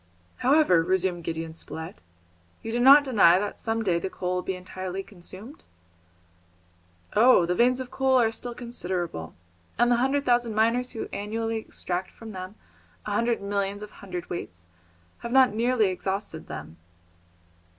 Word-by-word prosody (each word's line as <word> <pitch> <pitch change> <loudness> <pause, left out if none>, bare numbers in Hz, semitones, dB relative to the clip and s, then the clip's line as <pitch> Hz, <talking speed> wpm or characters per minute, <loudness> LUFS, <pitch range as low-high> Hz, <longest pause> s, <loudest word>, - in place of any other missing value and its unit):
"However," 265 - +4
resumed 180 0 0
Gideon 160 0 -4
Spilett, 160 0 -7 0.7
"you 225 - -4
do 240 - -1
not 275 +4 +8
deny 205 -10 +5
that 205 +2 -2
some 225 0 -2
day 175 -5 +1
the 190 - -4
coal 180 -1 -3
will 180 - -1
be 190 - -3
entirely 185 +1 -6
consumed?" 200 - -11 1.5
"Oh! 225 -5 +6
the 175 - 0
veins 250 +5 +3
of 255 -1 -6
coal 265 -1 +3
are 225 -2 +3
still 240 +1 -6
considerable, 180 - -4 0.4
and 240 0 +3
the 240 - +4
hundred 270 +3 +1
thousand 240 -3 +2
miners 230 +3 +1
who 225 - -4
annually 225 +2 -2
extract 185 -4 -4
from 225 -1 -11
them 185 +1 -7 0.5
a 210 - -4
hundred 230 0 0
millions 200 0 -2
of 210 - -9
hundredweights 175 - -7 0.5
have 235 - -6
not 260 -3 +5
nearly 230 -2 +2
exhausted 190 -2 -4
them." 80 +2 -8
210 Hz, 150 wpm, -26 LUFS, 180-240 Hz, 1.5 s, not